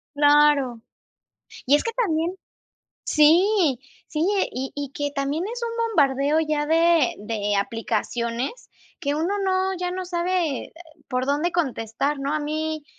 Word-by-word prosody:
Claro. 290 -4 +4 0.8
Y 275 - +5
es 295 - +1
que 460 - -2
también 345 -8 0 0.8
Sí, 330 - +4 0.3
sí, 315 0 -1 0.3
y 265 +1 -4
y 285 -1 -5
que 290 0 -3
también 285 +3 -2
es 475 +3 -5
un 465 0 -3
bombardeo 285 -4 +2
ya 305 -2 0
de 330 -3 +3
de 210 -1 -2
aplicaciones, 235 - -2 0.3
que 285 0 -1
uno 330 +7 -1
no, 380 0 +1
ya 360 0 -2
no 370 0 -4
sabe, 350 -4 -1
eh, - - -17 0.3
por 255 0 -2
dónde 295 +5 +1
contestar, 275 -3 -1
¿no? 275 +2 -2
A 305 - 0
mí, 310 +1 -3
300 Hz, 145 wpm, -23 LUFS, 275-345 Hz, 0.8 s, Y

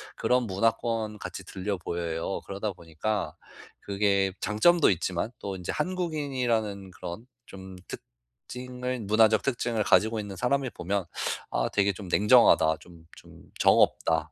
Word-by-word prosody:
그런 125 0 +2
문화권같이 105 -2 -1
들려 95 +2 -3
보여요. 85 +1 -3
그러다 100 +1 -3
보니까 85 +1 -3 0.5
그게 100 -1 +1
장점도 165 +11 +4
있지만 90 +3 -1
또 100 -1 -5
인제 90 -2 -4
한국인이라는 135 - -2
그런 90 +6 -8 0.2
좀 95 -1 -10
특징을 125 - -7
문화적 110 +1 +4
특징을 120 -4 0
가지고 110 +2 +3
있는 100 -2 -6
사람이 130 +4 0
보면 95 +1 -2 0.5
'아 - - 0
되게 100 0 +2
좀 95 0 -9
냉정하다. 100 -6 +5
좀 85 -2 -16
좀 - - -15 0.2
정 - - +6
없다.' 80 0 +2
100 Hz, 295 characters per minute, -27 LUFS, 90-115 Hz, 0.5 s, 정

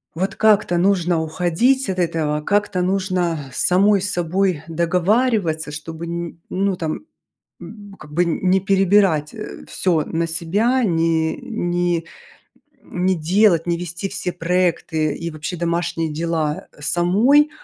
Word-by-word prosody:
вот 190 +3 -2
как-то 210 -5 +3
нужно 175 -3 +2
уходить 180 - +1
от 185 -1 -2
этого, 155 -3 0
как-то 205 +1 0
нужно 185 -3 0 0.2
самой 195 +2 +3
с 205 +1 -2
собой 175 -2 0
договариваться, 170 0 +1
чтобы 160 +2 -7
н 170 0 -5
ну, 195 0 0
там 160 -3 -4 0.6
м, 205 -2 -11
как 150 -1 -13
бы 175 +3 +2
н 170 - -1
не 190 +1 +4
перебирать, 195 -5 +2
э, 215 - -8
всё 170 -5 0
на 165 +1 -2
себя, 210 +10 +1
не 165 -3 +1
не 175 - -1 0.8
не 185 +1 -1
делать, 175 +1 +3
не 170 -1 +1
вести 180 +3 -5
все 185 -3 -4
проекты 165 -3 0
и 170 0 -5
вообще 155 +3 -5
домашние 170 -1 -1
дела 155 -1 -2
самой. 210 - +3
175 Hz, 135 wpm, -20 LUFS, 165-195 Hz, 0.8 s, не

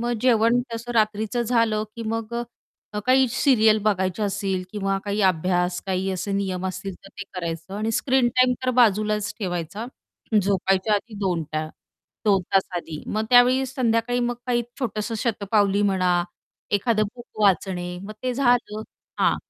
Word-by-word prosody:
मग 240 +1 -1
जेवण 235 -1 +4
तसं 235 +1 -5
रात्रीचं 220 +2 +1
झालं, 230 -2 +1
की 230 - -5
मग 225 +1 -3 0.7
काही 260 +1 +5
सीरियल 220 -4 +4
बघायचं 190 -1 0
असेल 195 -2 -2
किंवा 195 -2 -1
काही 205 +1 -1
अभ्यास 180 0 +1
काही 190 0 -1
असे 190 +2 -3
नियम 190 -2 -1
असतील 190 +1 -5
तर - - -11
ते - - -4
करायचं 170 0 -5
आणि 215 +2 -1
स्क्रीन 260 0 +2
टाईम 255 0 +5
तर 255 - +2
बाजूलाच 210 -2 +3
ठेवायचा 180 +2 -4 0.6
झोपायच्या 195 +1 +1
आधी 215 +2 -3
2 180 -4 0
टा 155 0 -1 0.6
2 195 -3 +3
तास 195 - +3
आधी. 160 -3 -6
मग 215 +1 -1
त्यावेळी 250 +2 +6
संध्याकाळी 245 -1 0
मग 245 0 0
काही 240 -1 +1 0.2
छोटंसं 225 -3 -2
शतपावली 205 -3 +1
म्हणा, 185 -3 +2 0.5
एखादं 215 +2 +2
बुक 240 -1 -12 0.2
वाचणे 180 -2 +1
मग 205 +2 -7
ते 255 -1 -1
झालं 245 -4 +1 0.4
हां, - - +3
210 Hz, 150 wpm, -24 LUFS, 190-235 Hz, 0.7 s, त्यावेळी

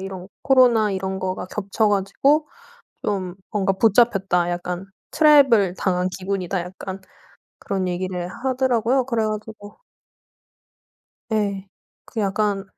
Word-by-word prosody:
이런 190 -1 -7
"코로나 245 -6 +4
이런 190 0 -3
거가 185 -1 -3
겹쳐 210 +2 -1
가지고 270 +10 +1 0.6
좀 185 -3 -2 0.2
뭔가 195 -2 +1
붙잡혔다. 195 -4 +2
약간 175 +1 -4 0.3
트랩을 270 - +5
당한 180 -1 0
기분이다." 190 -1 -2
약간 185 +2 -7 0.6
그런 195 -2 -2
얘기를 180 0 -3
하더라고요. 255 +1 0
그래 230 -4 0
가지고 215 -1 -7 1.5
예. 200 -2 -1 0.4
그 225 - -5
약간 200 0 0
195 Hz, 250 characters per minute, -22 LUFS, 185-225 Hz, 1.5 s, 트랩을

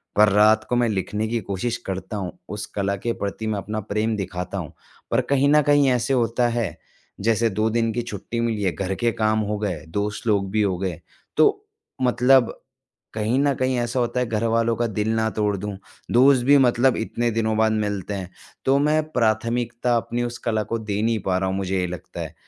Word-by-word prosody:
पर 105 +1 +6
रात 105 +2 +5
को 125 - +1
मैं 120 -1 +3
लिखने 105 +2 -2
की 115 +1 -1
कोशिश 100 +5 -3
करता 95 +2 -4
हूँ, 95 -4 -5
उस 105 0 -4
कला 100 0 0
के 115 - +1
प्रति 100 +2 -3
मैं 110 -1 -1
अपना 105 +2 -4
प्रेम 110 +2 -1
दिखाता 90 0 -4
हूँ, 85 -6 -6 0.4
पर - - +3
कहीं 140 0 +3
न - - +5
कहीं 145 -1 +4
ऐसे 125 +1 +1
होता 120 -1 +2
है, 115 -8 -2 0.4
जैसे 115 +2 +2
2 110 +3 0
दिन 115 0 +1
की 120 - -1
छुट्टी 115 +1 -5
मिली 115 -3 -1
है, 95 - +2
घर 95 +4 -2
के 120 +2 +1
काम 110 -1 +1
हो 105 0 -1
गए, 90 -8 -3
दोस्त 105 +5 -3
लोग 100 -3 +2
भी 110 +1 +1
हो 95 -3 +1
गए। 90 -3 -4 0.4
तो, - - +3 0.4
मतलब 125 0 +4 0.6
कहीं 110 +4 0
न 140 0 +3
कहीं 130 0 0
ऐसा 120 +2 -1
होता 120 +1 0
है 125 - 0
घरवालों 115 +1 +1
का 120 - 0
दिल 105 -1 -2
ना 110 0 +1
तोड़ 105 -2 0
दूँ, 100 +1 -5 0.3
दोस्त 130 +1 +5
भी 140 +2 +6
मतलब 125 -1 +3
इतने 120 +1 -1
दिनों 110 -1 0
बाद 110 0 +3
मिलते 105 -2 -2
हैं, 95 -2 -5 0.3
तो 135 +1 +4
मैं 150 +2 +2
प्राथमिकता 120 +1 0
अपनी 120 +1 -2
उस 120 0 -4
कला 110 -2 +1
को 115 - -1
दे 105 -2 -3
नहीं 115 0 +1
पा 95 -1 +2
रहा 95 0 -1
हूँ 95 - -1
मुझे 95 -1 -1
ये 90 - 0
लगता 90 0 -7
है। - - -6
110 Hz, 215 wpm, -23 LUFS, 100-120 Hz, 0.6 s, पर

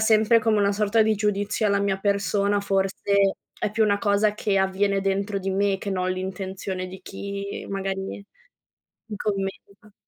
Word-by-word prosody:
sempre 220 +1 +5
come 220 -1 +2
una 200 0 +3
sorta 210 +2 +3
di 220 0 +2
giudizio 210 +1 0
alla 200 -1 +2
mia 200 -1 0
persona 200 0 +1
forse 195 0 +1 0.2
è 210 - -1
più 220 +1 +2
una 200 -1 +2
cosa 205 +1 +2
che 205 -2 0
avviene 195 +1 +1
dentro 195 +1 -1
di 195 0 -3
me, 195 0 +1
che 200 - -4
non 185 -1 0
l'intenzione 190 0 -4
di 190 +1 -10
chi 200 0 -6
magari 195 0 -4 0.8
mi 210 - -5
commenta. 200 0 -4
200 Hz, 160 wpm, -24 LUFS, 195-205 Hz, 0.8 s, sempre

